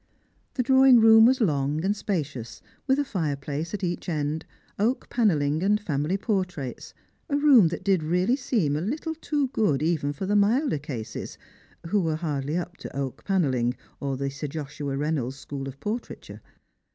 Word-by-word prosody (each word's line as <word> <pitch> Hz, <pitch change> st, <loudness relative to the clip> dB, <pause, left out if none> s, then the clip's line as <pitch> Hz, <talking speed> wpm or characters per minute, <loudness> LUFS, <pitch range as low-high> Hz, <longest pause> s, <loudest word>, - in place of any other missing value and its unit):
The 250 Hz, -, +1 dB
drawing 265 Hz, -1 st, +6 dB
room 225 Hz, 0 st, +8 dB
was 260 Hz, +1 st, +2 dB
long 150 Hz, -3 st, +1 dB
and 205 Hz, +2 st, +1 dB
spacious, 145 Hz, -, -4 dB, 0.3 s
with 265 Hz, 0 st, +3 dB
a 290 Hz, -, 0 dB
fireplace 150 Hz, -, -3 dB
at 205 Hz, -, -7 dB
each 175 Hz, 0 st, -2 dB
end, 150 Hz, -1 st, -2 dB, 0.3 s
oak 230 Hz, +6 st, 0 dB
panelling 155 Hz, -10 st, +2 dB
and 205 Hz, +2 st, +2 dB
family 155 Hz, -1 st, -1 dB
portraits, 185 Hz, -, -3 dB, 0.3 s
a 285 Hz, -, +1 dB
room 280 Hz, -, +6 dB
that 165 Hz, -, -4 dB
did 195 Hz, -4 st, +2 dB
really 180 Hz, +9 st, +1 dB
seem 225 Hz, -, 0 dB
a 150 Hz, -, -1 dB
little 305 Hz, -, -3 dB
too 295 Hz, -4 st, -1 dB
good 155 Hz, -, +1 dB
even 155 Hz, -3 st, 0 dB
for 145 Hz, +6 st, -5 dB
the 205 Hz, +2 st, +1 dB
milder 220 Hz, -, +2 dB
cases, 130 Hz, -6 st, -6 dB, 0.5 s
who 200 Hz, +4 st, +1 dB
were 160 Hz, -3 st, 0 dB
hardly 150 Hz, -1 st, -2 dB
up 180 Hz, 0 st, -5 dB
to -, -, -9 dB
oak 135 Hz, -2 st, -4 dB
panelling 130 Hz, -11 st, +1 dB, 0.2 s
or 135 Hz, -1 st, -2 dB
the 140 Hz, +1 st, -2 dB
Sir 145 Hz, +2 st, -5 dB
Joshua 145 Hz, -1 st, -5 dB
Reynolds' 140 Hz, -3 st, -1 dB
school 135 Hz, -1 st, -6 dB
of 135 Hz, 0 st, -9 dB
portraiture. 225 Hz, +4 st, -6 dB
165 Hz, 170 wpm, -26 LUFS, 145-215 Hz, 0.5 s, room